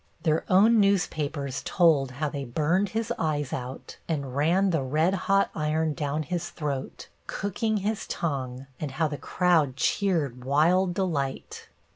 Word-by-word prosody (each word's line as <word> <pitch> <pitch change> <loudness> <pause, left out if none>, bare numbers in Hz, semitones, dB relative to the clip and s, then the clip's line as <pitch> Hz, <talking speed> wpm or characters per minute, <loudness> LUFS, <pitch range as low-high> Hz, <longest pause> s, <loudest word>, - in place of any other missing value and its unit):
Their 155 0 +2
own 215 +5 +6
newspapers 155 -9 0
told 155 -7 +3
how 150 +3 -2
they 140 -1 -4
burned 160 +10 +1
his 225 +2 -2
eyes 150 -4 -1
out 125 0 -6
and, 140 -5 -2
ran 175 +7 +3
the 160 -4 +1
red 155 +7 +1
hot 195 +1 +2
iron 155 0 0
down 150 0 -2
his 175 +2 -3
throat, 140 -4 -5 0.2
cooking 215 +2 -1
his 215 0 -2
tongue, 130 -5 -3
and 150 - -3
how 160 +3 +1
the 145 -2 -5
crowd 160 -4 +2
cheered 145 - 0
wild 175 +7 +3
delight. 150 -9 -3
155 Hz, 145 wpm, -27 LUFS, 140-185 Hz, 0.2 s, own